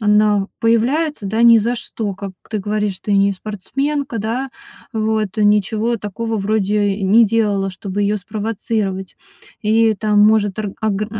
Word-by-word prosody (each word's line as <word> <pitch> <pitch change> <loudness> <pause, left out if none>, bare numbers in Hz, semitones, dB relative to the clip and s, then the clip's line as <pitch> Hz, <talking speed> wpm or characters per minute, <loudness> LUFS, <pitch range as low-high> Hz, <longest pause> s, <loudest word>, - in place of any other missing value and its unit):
она 210 -1 +3
появляется, 235 +3 +1
да, 220 +4 0
ни 235 -1 +8
за 235 +3 0
что. 210 -4 -5
Как 195 0 -7 0.2
ты 215 - -1
говоришь, 205 -1 -2
ты 205 - -1
не 200 0 +3
спортсменка, 255 +7 -3
да? 235 +6 -2 0.4
Вот 220 -2 -1
ничего 210 +3 +2
такого 225 +2 -4
вроде 205 0 +1
и 200 - -6
не 225 +4 +6
делала, 205 -3 0
чтобы 195 +2 -4
её 205 +1 +1
спровоцировать. 205 -2 -3 0.5
И 220 +1 +3
там 210 0 +1
может 210 -1 +3
орг 205 -2 -4
огр 210 -1 -1
210 Hz, 150 wpm, -18 LUFS, 200-225 Hz, 0.5 s, ни